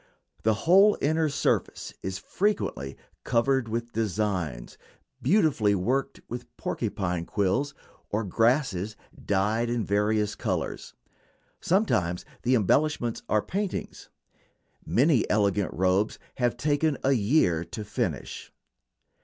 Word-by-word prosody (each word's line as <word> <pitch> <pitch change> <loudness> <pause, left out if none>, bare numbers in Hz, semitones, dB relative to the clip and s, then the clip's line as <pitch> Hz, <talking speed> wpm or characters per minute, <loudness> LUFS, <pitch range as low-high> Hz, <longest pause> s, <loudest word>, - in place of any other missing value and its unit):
The 110 0 +2
whole 195 +5 +6
inner 155 +2 +1
surface 140 - -1
is 95 0 -3
frequently 100 - -2 0.3
covered 125 +1 +1
with 115 +1 -3
designs 95 - -2 0.5
beautifully 135 - +3
worked 125 +9 -1
with 120 +1 -6
porcupine 90 -3 -2
quills, 115 +9 0 0.3
or 105 +2 -1
grasses 110 - +1 0.3
dyed 105 +4 +1
in 120 -2 -1
various 105 +1 +1
colors. - - -3 0.6
Sometimes 110 - +1 0.2
the 125 +1 +3
embellishments 120 +2 +1
are 105 - +2
paintings. 200 0 -4 0.7
Many 135 0 +2
elegant 100 -2 +1
robes 95 +4 +1 0.2
have 120 -1 +1
taken 145 +1 +1
a 135 - +3
year 105 - +2
to 110 - -6
finish. 105 - -4
115 Hz, 105 wpm, -27 LUFS, 100-140 Hz, 0.7 s, whole